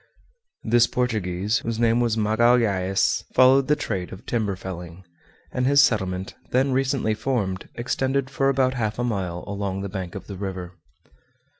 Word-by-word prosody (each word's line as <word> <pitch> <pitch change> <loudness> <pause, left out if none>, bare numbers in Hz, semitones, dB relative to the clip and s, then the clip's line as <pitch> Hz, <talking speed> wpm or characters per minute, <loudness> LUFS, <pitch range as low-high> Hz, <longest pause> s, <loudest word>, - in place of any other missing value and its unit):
This 120 +1 +4
Portuguese, 105 -4 -1
whose 115 -1 -3
name 115 0 +3
was 115 -2 +1
Magalhaës, 110 -3 +2
followed 130 +1 +6
the 150 - +4
trade 95 -10 -4
of 95 +4 -10
timber 110 -5 -1
felling, 90 -1 -8 0.5
and 125 0 0
his 140 +1 +5
settlement, 95 -8 +1 0.2
then 135 +2 +2
recently 130 -3 +1
formed, 105 -5 -2
extended 130 +2 -1
for 135 0 0
about 130 -1 +2
half 110 -4 -2
a 120 - -1
mile 95 -7 -2
along 100 -1 -3
the 100 - -4
bank 95 -3 -6
of - - -7
the 100 - -8
river. 95 -2 -5
110 Hz, 155 wpm, -24 LUFS, 95-125 Hz, 0.5 s, followed